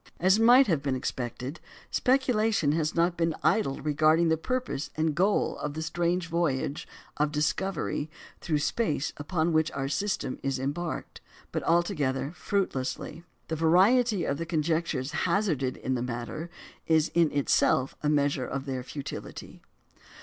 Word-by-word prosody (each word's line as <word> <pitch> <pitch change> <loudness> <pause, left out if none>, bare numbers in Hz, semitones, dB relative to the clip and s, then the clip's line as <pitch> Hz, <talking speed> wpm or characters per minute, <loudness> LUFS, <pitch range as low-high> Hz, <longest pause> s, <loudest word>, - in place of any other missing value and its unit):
As 190 +4 +4
might 245 +4 +7
have 165 - +1
been 140 -2 -1
expected, 130 +3 -4 0.3
speculation 225 - +2
has 155 0 0
not 170 +1 +2
been 165 -2 0
idle 205 -12 +2
regarding 155 +2 +3
the 160 - +4
purpose 250 - -3
and 155 0 +1
goal 190 +6 +1
of 150 0 -4
the 160 - -3
strange 175 +2 0
voyage 155 -4 -1 0.3
of 150 0 +1
discovery 155 +1 -1 0.3
through 155 -3 0
space 150 - -1
upon 160 +2 -1
which 155 0 +2
our 135 -1 -2
system 145 -1 -2
is 135 -1 -1
embarked; 145 +6 -4 0.3
but - - -2
altogether 155 -6 0
fruitlessly. 165 -5 -2 0.3
The 160 - -2
variety 190 +7 +4
of 140 - -1
the 165 - -2
conjectures 160 -4 -1
hazarded 165 -7 0
in 130 - -2
the 125 - -1
matter 125 +7 -5 0.4
is 160 -1 +3
in 170 -3 +3
itself 135 -2 +2
a 150 - +1
measure 145 -3 +1
of 135 0 -4
their 130 -2 -3
futility. 135 +2 -8
160 Hz, 145 wpm, -28 LUFS, 140-175 Hz, 0.4 s, might